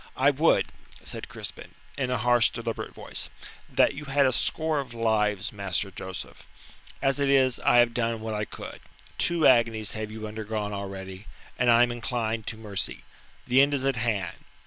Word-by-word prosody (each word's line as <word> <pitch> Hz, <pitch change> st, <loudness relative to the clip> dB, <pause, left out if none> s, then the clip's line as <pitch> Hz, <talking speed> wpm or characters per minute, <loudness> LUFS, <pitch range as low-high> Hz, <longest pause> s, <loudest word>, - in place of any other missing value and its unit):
"I 135 Hz, +2 st, +5 dB
would," 150 Hz, +4 st, +3 dB, 0.4 s
said -, -, -5 dB
Crispin, -, -, -5 dB, 0.2 s
in 135 Hz, -3 st, -1 dB
a 125 Hz, -, +1 dB
harsh, 120 Hz, 0 st, +4 dB
deliberate 115 Hz, -1 st, -4 dB
voice, -, -, -4 dB, 0.4 s
"that -, -, +3 dB
you 150 Hz, -, -8 dB
had 140 Hz, 0 st, +3 dB
a 130 Hz, -, +4 dB
score 155 Hz, +4 st, 0 dB
of 125 Hz, -4 st, -6 dB
lives, 110 Hz, -2 st, +1 dB
Master 100 Hz, -1 st, -1 dB
Joseph. 95 Hz, 0 st, -7 dB, 0.6 s
As 135 Hz, +1 st, +2 dB
it 140 Hz, -1 st, +2 dB
is 130 Hz, -2 st, +4 dB
I -, -, +3 dB
have 120 Hz, -1 st, +5 dB
done 115 Hz, -1 st, 0 dB
what 110 Hz, 0 st, -4 dB
I 105 Hz, 0 st, -1 dB
could. -, -, -9 dB, 0.4 s
Two 170 Hz, -2 st, +2 dB
agonies 115 Hz, -4 st, +4 dB
have 110 Hz, -1 st, -4 dB
you 110 Hz, 0 st, -7 dB
undergone 105 Hz, -1 st, -4 dB
already, 95 Hz, 0 st, -6 dB, 0.3 s
and 125 Hz, -1 st, +3 dB
I 120 Hz, 0 st, +7 dB
am 120 Hz, -, +1 dB
inclined 115 Hz, -2 st, -2 dB
to 110 Hz, -, -4 dB
mercy. 105 Hz, -3 st, -2 dB, 0.4 s
The 130 Hz, +2 st, +5 dB
end 140 Hz, +1 st, +3 dB
is 135 Hz, -1 st, -1 dB
at 135 Hz, -2 st, +1 dB
hand. 105 Hz, -6 st, -1 dB
115 Hz, 180 wpm, -27 LUFS, 105-130 Hz, 0.6 s, I